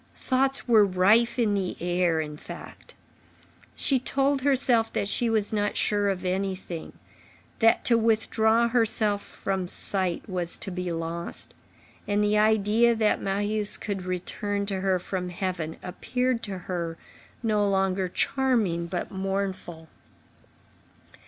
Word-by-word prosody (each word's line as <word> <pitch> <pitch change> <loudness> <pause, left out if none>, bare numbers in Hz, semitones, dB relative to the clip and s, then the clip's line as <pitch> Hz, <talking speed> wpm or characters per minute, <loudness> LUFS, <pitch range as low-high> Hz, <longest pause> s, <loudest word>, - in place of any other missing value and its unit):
Thoughts 270 +1 0
were 225 -3 +6
rife 200 +6 +3
in 225 -4 +2
the 195 -3 -2
air, 175 -2 +1
in 150 -1 -6
fact. - - -11 0.8
She 270 -2 +3
told 275 +2 0
herself 255 -4 +3
that 200 - -1
she 235 +3 0
was 220 -1 0
not 205 -1 0
sure 205 -1 +1
of 190 -1 -3
anything, 185 -2 -3 0.7
that 225 0 +4
to 235 -2 +5
withdraw 225 +1 +2
herself 220 -3 +2
from 190 -2 -3
sight 185 0 -3
was 180 -3 -1
to 195 - -4
be 180 -1 -3
lost; 165 +1 -4 0.5
and 205 0 +1
the 210 0 +2
idea 220 +2 +3
that 220 -1 +1
Marius 205 +2 0
could 200 -2 -4
return 200 +3 -3
to 195 -2 -3
her 190 -1 +2
from 180 0 -4
heaven 175 -3 -4
appeared 250 +6 -2
to 200 -4 -5
her 175 -2 -4 0.5
no 210 -2 +2
longer 190 -1 +1
charming 210 -6 0
but 175 0 -4
mournful. 190 -4 -4
200 Hz, 135 wpm, -26 LUFS, 180-225 Hz, 0.8 s, were